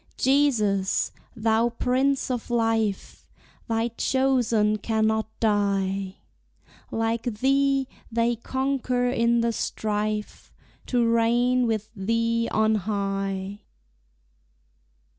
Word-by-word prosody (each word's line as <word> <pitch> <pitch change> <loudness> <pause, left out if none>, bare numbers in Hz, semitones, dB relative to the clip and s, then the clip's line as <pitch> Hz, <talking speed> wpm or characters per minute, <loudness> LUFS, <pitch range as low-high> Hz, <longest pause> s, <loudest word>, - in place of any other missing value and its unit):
Jesus, 230 -9 +2 0.2
thou 225 +1 +2
Prince 260 +3 0
of 245 -1 -4
Life, 225 -4 -1 0.4
Thy 230 0 0
chosen 235 -4 +1
cannot 220 0 0
die! 195 -3 0 0.7
Like 225 0 -1
Thee 270 +3 +1 0.2
they 235 +1 +1
conquer 255 0 -1
in 235 -1 +2
the 230 0 0
strife, 210 -1 -3 0.4
To 240 -2 +2
reign 240 +2 +2
with 220 -1 -2
Thee 230 +3 0
on 220 0 +2
high. 195 -1 -2
225 Hz, 85 wpm, -25 LUFS, 210-245 Hz, 0.7 s, Jesus